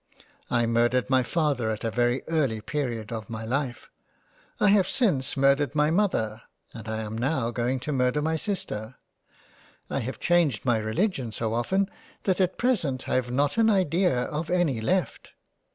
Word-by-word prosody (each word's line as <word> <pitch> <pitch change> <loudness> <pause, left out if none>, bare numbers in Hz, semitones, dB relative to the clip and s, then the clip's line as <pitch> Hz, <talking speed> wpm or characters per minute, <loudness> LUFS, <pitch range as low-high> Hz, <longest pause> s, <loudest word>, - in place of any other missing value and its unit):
I 120 -1 +2
murdered 120 +2 +1
my 130 0 +5
father 135 -3 0
at 110 -1 -3
a 115 - -1
very 120 +2 +1
early 140 -9 0
period 120 -3 -3
of 110 -3 -5
my 110 -1 -5
Life, 125 0 -3 0.7
I 205 - +4
have 200 -2 +4
since 150 - 0
murdered 140 +2 +3
my 150 +1 +3
Mother, 115 - 0 0.3
and 110 -1 -9
I 110 0 -2
am 110 0 -5
now 125 0 0
going 125 +3 -1
to 150 - -3
murder 125 +1 +1
my 160 +2 0
Sister. 130 - -4 1.0
I - - 0
have 130 +1 -5
changed 170 -10 +2
my 120 -3 +3
religion 115 - -1
so 110 0 -2
often 190 +12 +1 0.4
that 190 -1 +1
at 185 -1 +1
present 165 - 0
I - - -1
have 125 -1 +1
not 140 - +1
an 225 0 +5
idea 180 - +2
of 155 +3 -4
any 170 -10 +1
left. 185 +10 -1
130 Hz, 170 wpm, -26 LUFS, 115-165 Hz, 1.0 s, my